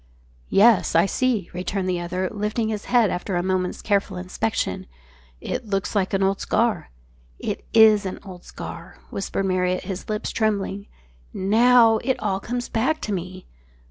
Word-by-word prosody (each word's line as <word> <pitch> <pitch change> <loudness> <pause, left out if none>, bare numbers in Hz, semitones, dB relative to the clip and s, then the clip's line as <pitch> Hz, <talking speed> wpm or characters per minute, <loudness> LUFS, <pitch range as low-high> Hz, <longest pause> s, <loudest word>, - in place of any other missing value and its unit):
"Yes, 215 -3 +4
I 165 +2 +5
see," 230 -2 0
returned 185 +2 -3
the 180 -1 0
other, 180 +2 -2
lifting 215 +2 -2
his 210 -2 -4
head 240 -4 +3
after 180 +1 -3
a 175 - 0
moment's 185 -1 -1
careful 200 -2 0
inspection. 180 -11 -2 0.5
"It 250 - -4
looks 195 +1 -2
like 190 -2 +1
an 195 - +1
old 195 +1 +1
scar." 230 - 0 0.5
"It - - -4
is 220 -2 +6
an 185 - -5
old 185 -3 -11
scar," - - -9
whispered 195 0 -2
Marriott, 185 -1 0
his 190 +1 -6
lips 215 +1 -2
trembling. 205 -2 -1 0.5
"Now 225 +3 +5
it 260 +3 0
all 195 -2 -1
comes 245 +4 -4
back 265 +8 0
to 210 - -4
me." 185 0 -6
200 Hz, 160 wpm, -23 LUFS, 185-220 Hz, 0.5 s, is